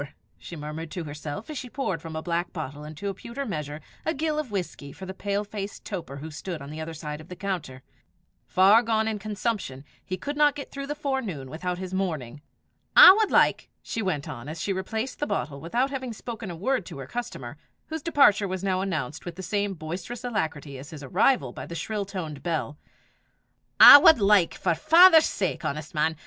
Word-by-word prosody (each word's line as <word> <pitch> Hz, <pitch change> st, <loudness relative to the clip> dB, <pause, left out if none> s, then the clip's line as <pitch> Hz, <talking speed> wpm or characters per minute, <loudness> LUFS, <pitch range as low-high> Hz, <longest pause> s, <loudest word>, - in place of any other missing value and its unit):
she 170 Hz, -, -9 dB
murmured 155 Hz, +1 st, -6 dB
to 175 Hz, +2 st, -5 dB
herself 150 Hz, +4 st, -7 dB
as 305 Hz, -3 st, -5 dB
she 250 Hz, -, -8 dB
poured 190 Hz, -, -3 dB
from 165 Hz, -1 st, -8 dB
a 160 Hz, -, -4 dB
black 175 Hz, 0 st, -2 dB
bottle 150 Hz, -3 st, -6 dB
into 155 Hz, +6 st, -7 dB
a 200 Hz, -, -1 dB
pewter 235 Hz, +7 st, -6 dB
measure 150 Hz, -, -4 dB, 0.2 s
a 320 Hz, -, -1 dB
gill 305 Hz, +1 st, -1 dB
of 300 Hz, -5 st, -4 dB
whisky 180 Hz, -8 st, -5 dB
for 190 Hz, -, -10 dB
the 190 Hz, -, -6 dB
pale 200 Hz, +1 st, -2 dB
faced 205 Hz, -1 st, -7 dB
toper 170 Hz, -9 st, -6 dB
who 155 Hz, +3 st, -8 dB
stood 170 Hz, +2 st, -6 dB
on 140 Hz, +1 st, -9 dB
the 155 Hz, +1 st, -6 dB
other 160 Hz, +1 st, -5 dB
side 150 Hz, -1 st, -6 dB
of 155 Hz, -, -14 dB
the 180 Hz, -, -7 dB
counter: 170 Hz, -10 st, -5 dB, 0.6 s
far 195 Hz, +5 st, +6 dB
gone 220 Hz, -2 st, 0 dB
in 220 Hz, -1 st, -2 dB
consumption, 205 Hz, -, -3 dB, 0.2 s
he 185 Hz, -, -4 dB
could 290 Hz, +7 st, -5 dB
not 295 Hz, -1 st, +4 dB
get 285 Hz, -, -7 dB
through 275 Hz, 0 st, -6 dB
the 295 Hz, -, -3 dB
forenoon 235 Hz, -, -3 dB
without 180 Hz, +3 st, -3 dB
his 185 Hz, 0 st, -6 dB
morning. 155 Hz, -9 st, -3 dB, 0.5 s
"I 370 Hz, -, +12 dB
wad 430 Hz, 0 st, +1 dB
like," -, -, +3 dB
she 225 Hz, -, -4 dB
went 170 Hz, -7 st, -2 dB
on, 130 Hz, -2 st, -7 dB
as 160 Hz, +1 st, -6 dB
she 195 Hz, -, -1 dB
replaced 220 Hz, +7 st, -4 dB
the 295 Hz, -, -1 dB
bottle 140 Hz, +2 st, -3 dB
without 245 Hz, +11 st, 0 dB
having 260 Hz, -3 st, -4 dB
spoken 225 Hz, -2 st, -7 dB
a 175 Hz, -, -6 dB
word 240 Hz, +6 st, 0 dB
to -, -, -8 dB
her 135 Hz, -, -7 dB
customer, 240 Hz, -, -6 dB, 0.3 s
whose 320 Hz, 0 st, -5 dB
departure 275 Hz, -11 st, +4 dB
was 185 Hz, 0 st, -4 dB
now 185 Hz, -1 st, 0 dB
announced 155 Hz, -9 st, -3 dB
with 175 Hz, -2 st, -7 dB
the 190 Hz, -, -8 dB
same 200 Hz, +1 st, -1 dB
boisterous 180 Hz, +10 st, -6 dB
alacrity 160 Hz, -, -3 dB
as 140 Hz, +3 st, -10 dB
his 155 Hz, -3 st, -9 dB
arrival 215 Hz, -, +2 dB
by -, -, -8 dB
the 170 Hz, -, -7 dB
shrill 210 Hz, +3 st, -3 dB
toned 165 Hz, -7 st, -6 dB
bell 160 Hz, -3 st, -2 dB, 1.0 s
"I 285 Hz, -, +12 dB
wad 320 Hz, -, +7 dB
like, 200 Hz, -4 st, +4 dB
for -, -, 0 dB
'is 165 Hz, -, -2 dB
father's 330 Hz, -1 st, +7 dB
sake, 185 Hz, -4 st, -2 dB
honest 155 Hz, +3 st, -4 dB
man! 160 Hz, +1 st, +1 dB
185 Hz, 210 wpm, -26 LUFS, 155-225 Hz, 1.0 s, I